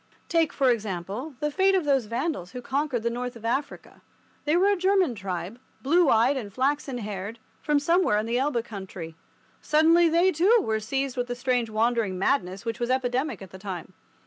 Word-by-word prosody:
Take, 330 -2 +2
for 265 -3 +3
example, 215 - -4
the 300 0 0
fate 385 +4 +3
of 365 -5 +1
those 270 -5 +2
Vandals 230 - -3
who 250 - -6
conquered 270 -3 -1
the 235 - 0
north 245 +1 -4
of 230 -1 -11
Africa. 270 +5 -3 0.4
They 300 +2 +2
were 385 +3 +4
a 405 - +3
German 375 -5 +2
tribe, 190 +1 -5 0.2
blue 325 +3 +4
eyed 240 +5 +4
and 210 -6 -5
flaxen 270 +2 -1
haired, 210 0 -5 0.2
from 300 -1 +2
somewhere 335 - +2
in 215 - 0
the 235 +2 0
Elbe 260 -4 0
country. 190 -6 -8 0.5
Suddenly 330 +2 +4
they, 345 +3 +4
too, 375 +8 +4
were 220 0 0
seized 270 +4 -2
with 245 0 -1
the 245 - -3
strange 245 -2 0
wandering 220 -3 0
madness 190 -2 0
which 230 +2 -3
was 240 0 -2
epidemic 255 -2 -1
at 190 - -12
the 190 - -11
time. 185 -2 -7
250 Hz, 195 wpm, -26 LUFS, 215-295 Hz, 0.5 s, were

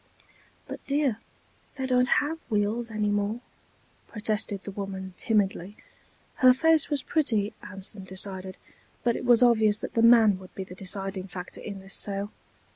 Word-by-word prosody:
"But - - -8
dear, 275 -6 +1 0.6
they 265 -2 -3
don't 250 -1 +3
have 300 +5 +1
wheels 220 +2 0
anymore," 210 0 -1 0.7
protested 210 -2 -2
the 200 - -6
woman, 190 -1 -6
timidly. 205 -3 0 0.6
Her 255 -1 +7
face 320 +2 +3
was 285 -3 -1
pretty, 220 -10 0
Anson 195 0 -5
decided, 190 0 -5 0.5
but 235 -1 +2
it - - -5
was 240 0 +6
obvious 220 -3 +4
that - - -6
the 230 - +2
man 225 -4 +6
would 185 -1 -14
be 190 - -4
the 185 - -11
deciding 195 0 -4
factor 180 -1 -8
in 200 -2 -7
this 195 0 -8
sale. 200 +1 -1
210 Hz, 150 wpm, -27 LUFS, 195-240 Hz, 0.7 s, Her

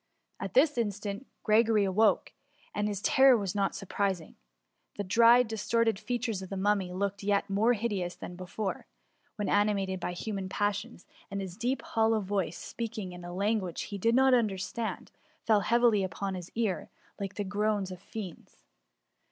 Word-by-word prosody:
At - - -5
this 295 - +4
instant 205 +1 -3 0.2
Gregory 220 -1 +4
awoke, 200 +1 +2 0.4
and 205 0 0
his 205 -1 -3
ter 265 -1 +6
ror - - +1
was 195 -3 -2
not 200 -1 0
surprising. 195 -3 -2 0.6
The 205 - -3
dried 235 +5 +6
distorted 225 -1 +1
fea 245 +3 -2
tures 225 -5 -3
of 190 - -8
the 195 - -4
Mummy 195 -2 +1
looked 200 +2 -2
yet 200 0 +1
more 220 +5 +3
hideous 200 -6 -2
than 175 - -8
before, 190 +3 -4 0.5
when 210 - -2
animated 200 -2 +1
by 180 - -3
human 195 +1 -4
passions, 205 +1 -2 0.2
and 200 - -3
his 190 -3 -5
deep 245 +5 -1
hollow 225 0 +2
voice, 190 -4 -2
speaking 220 -5 -5
in 180 0 -9
a 175 - -7
lan 205 +5 +1
guage 180 -4 -5
he 200 - -5
Hid 230 +1 +4
not 265 0 +5
understand, 220 -1 -1 0.3
fell 215 -2 +5
heavily 230 -1 +3
upon 195 +1 -3
his 180 -2 -6
ear, 220 -5 -1 0.3
like 195 -1 -4
the 205 - -2
groans 205 -1 -1
of 185 0 -8
fiends. 195 -4 -9
205 Hz, 170 wpm, -30 LUFS, 190-225 Hz, 0.6 s, ter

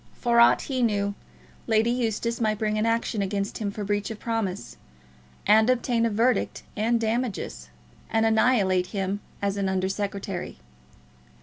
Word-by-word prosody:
For 235 -1 +2
aught 235 - +6
he 260 -2 -2
knew, 205 -3 +1 0.5
Lady 225 +1 +3
Eustace 235 -1 -1
might 215 -1 +1
bring 215 0 0
an 220 - +1
action 230 -2 0
against 200 +1 -2
him 210 -2 -1
for 205 +1 -5
breach 205 0 -1
of 220 - -6
promise, 215 - -3 0.7
and 220 +3 +5
obtain 240 -2 +2
a - - 0
verdict 230 +4 0
and 230 +2 +1
damages, 225 - -2 0.4
and 225 0 +2
annihilate 220 -5 +3
him 195 0 -2 0.2
as 200 0 0
an 195 -1 0
Under 190 0 0
Secretary. 195 -2 -4
215 Hz, 150 wpm, -26 LUFS, 200-230 Hz, 0.7 s, aught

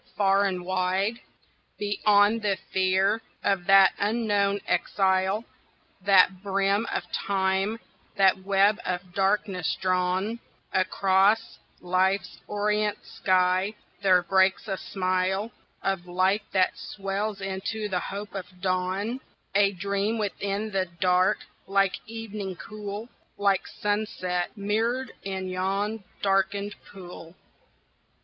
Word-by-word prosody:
Far 195 0 +4
and 180 -2 -2
wide, 185 +4 0 0.6
Beyond 205 +1 +3
the 200 -2 0
fear 190 +3 +2 0.2
of 195 -3 0
that 195 -1 +7
unknown 205 -2 +1
exile, 190 +2 +1 0.6
That 185 -1 +5
brim 200 +2 +1
of - - -1
Time, 195 +2 0 0.4
that 195 -2 +4
web 200 +2 +3
of 180 0 -4
darkness 195 -2 0
drawn 185 +4 0 0.3
Across 195 +3 +2 0.2
Life's 185 +2 0
orient 210 0 0
sky, 185 +2 +1 0.3
there 185 -2 +4
breaks 190 +3 +2
a 195 - -1
smile 190 +3 -1 0.3
Of 195 -2 -1
light 185 +4 +2
that 185 -1 +2
swells 200 +1 -3
into 195 +3 -3
the 185 -3 -1
hope 200 +3 -6
of 185 -2 -8
dawn: 185 +6 -1 0.3
A 200 0 +4
dream 200 +4 -1
within 205 0 -2
the 190 -1 0
dark, 185 0 +2 0.2
like 195 0 +2
evening 215 -4 -6
cool, 210 +3 -7 0.3
Like 200 -2 +1
sunset 205 -4 -2
mirror'd 225 +5 -1
in 190 -1 -4
yon 195 +4 -2 0.2
darken'd 200 +1 +1 0.2
pool. 175 -3 -11
195 Hz, 110 wpm, -26 LUFS, 185-205 Hz, 0.6 s, that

